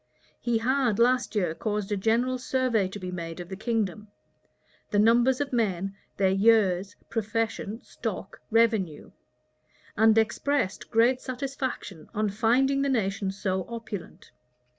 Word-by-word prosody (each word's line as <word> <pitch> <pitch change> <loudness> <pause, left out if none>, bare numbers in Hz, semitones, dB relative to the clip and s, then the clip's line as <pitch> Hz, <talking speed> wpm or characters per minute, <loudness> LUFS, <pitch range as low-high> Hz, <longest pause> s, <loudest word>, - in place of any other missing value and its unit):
He 240 -1 +1
had 250 -1 +1
last 245 0 +2
year 180 -6 +1
caused 210 +2 -3
a - - +2
general 235 +5 +1
survey 250 -5 +1
to 190 - -7
be 185 -2 -6
made 170 -1 -6
of 175 0 -7
the 190 - -5
kingdom; 215 -1 -2 0.8
the 205 - 0
numbers 240 +4 +4
of 285 -2 -2
men, 195 -4 0 0.2
their 190 -1 +3
years, 195 -2 +3 0.2
profession, 225 0 -2
stock, - - -6
revenue;[*] 220 -8 +1 0.8
and 220 +1 +5
expressed 225 -1 0
great 245 +3 +3
satisfaction 255 - -5
on 210 -1 0
finding 250 +6 +2
the 280 - +1
nation 200 -5 0
so 190 -1 -2
opulent. 225 -5 -7
220 Hz, 135 wpm, -27 LUFS, 195-240 Hz, 0.8 s, and